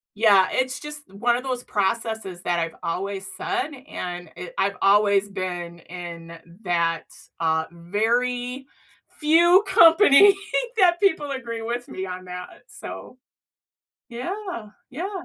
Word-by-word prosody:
Yeah, 205 -3 +5
it's 260 0 0
just 295 -6 -9
one 235 +4 +1
of 250 - -4
those 255 -2 -3
processes 205 -2 -2
that 175 -1 0
I've 165 -1 -2
always 195 +3 -3
said, 375 -2 -2 0.2
and, 175 -2 -6
eh 175 0 -7
I've 200 +1 +1
always 200 0 +4
been 175 -3 -5
in 170 -1 -9 0.3
that, 170 -2 0 0.4
uh, 160 -1 +1
very 245 +8 -1 0.5
few 340 +5 +5
company 360 +1 +7 0.4
that 355 -4 +4
people 370 -8 +2
agree 235 -4 -5
with 240 +2 -4
me 185 - -5
on 185 0 -7
that, 180 0 -8
so 255 - -9 0.9
Yeah, 275 - -6 0.2
yeah. 330 +9 -4
220 Hz, 125 wpm, -24 LUFS, 180-275 Hz, 0.9 s, company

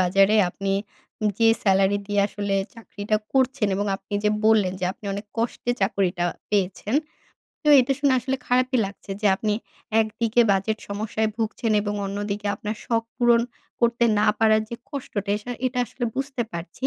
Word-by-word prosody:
বাজারে 195 +3 +4
আপনি 195 +2 -3 0.7
যে 225 -1 +5
স্যালারি 195 0 +3
দিয়ে 205 -1 +1
আসলে 200 -1 -3 0.2
চাকরিটা 215 -2 -3 0.2
করছেন 260 -4 +2
এবং 205 +1 -1
আপনি 205 - -8
যে 210 - +4
বললেন 215 -4 +4
যে - - 0
আপনি 210 - -20
অনেক 205 +2 -5
কষ্টে 235 +1 -1
চাকরিটা 190 -3 +1 0.3
পেয়েছেন 200 +2 0 0.7
তো 300 - 0
এটা 265 +2 +1
শুনে 285 -2 +3
আসলে 265 +3 -2
খারাপই 255 +1 +2
লাগছে 200 0 -11
যে 215 - +1
আপনি 210 0 0 0.5
একদিকে 220 +2 +1
বাজেট 200 +3 +1
সমস্যায় 215 +2 -1
ভুগছেন 225 0 -1
এবং 205 0 -2
অন্যদিকে 205 +1 -3
আপনার 215 +1 -5
শখ 230 -1 +1
পূরণ 240 -1 +4 0.4
করতে 235 0 +3
না 210 - +3
পারার 220 -1 +4
যে 235 - -3 0.2
কষ্টটা 210 -7 -4
এসা 210 +4 -7 0.2
এটা 250 0 -2
আসলে 245 +3 -5
বুঝতে 270 -2 -2
পারছি 170 +10 -4
215 Hz, 160 wpm, -24 LUFS, 200-235 Hz, 0.7 s, যে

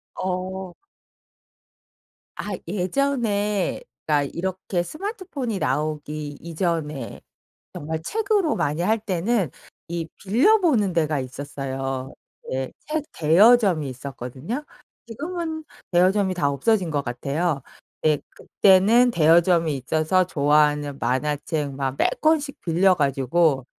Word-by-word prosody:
어. 185 0 -4 1.6
아 - - -5 0.2
예전에 210 0 0 0.2
그러니까 145 -2 +1
이렇게 185 0 -2
스마트폰이 310 - -4
나오기 150 +1 -2
이전에 160 -6 -3 0.5
정말 160 +2 -4
책으로 415 - +1
많이 150 +4 -1
할 220 +5 +2
때는 195 - 0 0.4
이 170 -1 -4
빌려 260 - +4
보는 245 - +2
데가 155 -3 +1
있었어요. 135 0 -5 0.4
네. 130 0 -2 0.2
책 305 0 -1
대여점이 180 - +5
있었거든요. 135 - -6 0.4
지금은 320 +6 -4 0.3
대여점이 190 +2 +3
다 150 -6 +1
없어진 180 - +1
것 145 -2 -1
같아요. 140 +5 -2 0.4
네 155 -1 +3
그때는 210 +6 +4
대여점이 165 -3 +4
있어서 155 +7 +1
좋아하는 145 -2 +2
만화책 145 +2 -1
막 135 -1 -2
몇 - - +1
권씩 305 -2 +1
빌려 180 +3 +3
가지고 140 0 +1
170 Hz, 245 characters per minute, -23 LUFS, 145-210 Hz, 1.6 s, 대여점이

